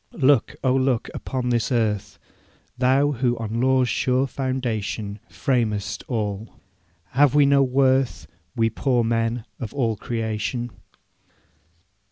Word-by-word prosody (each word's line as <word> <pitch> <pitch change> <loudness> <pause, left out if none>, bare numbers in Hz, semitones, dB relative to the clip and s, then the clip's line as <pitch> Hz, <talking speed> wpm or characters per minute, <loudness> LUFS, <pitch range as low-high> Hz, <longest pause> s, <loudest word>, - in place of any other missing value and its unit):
'Look, 140 -5 +3
oh 130 -1 +3
look 130 -3 +1
upon 130 -2 -3
this 120 0 0
earth, 105 -4 0 0.6
Thou 135 +3 +3
who 120 -2 0
on 115 +1 -3
law's 130 -1 +3
sure 130 +2 +1
foundation 115 -6 -3
Framedst 110 -6 -1
all! 105 -3 -3 0.6
Have 140 +1 +4
we 145 -1 +6
no 140 0 +4
worth, 130 0 +2 0.3
We 115 -1 +2
poor 125 +1 +1
men, 115 0 0
of 120 +2 -6
all 115 -5 +1
creation? 115 +2 -3
120 Hz, 120 wpm, -23 LUFS, 115-130 Hz, 0.6 s, we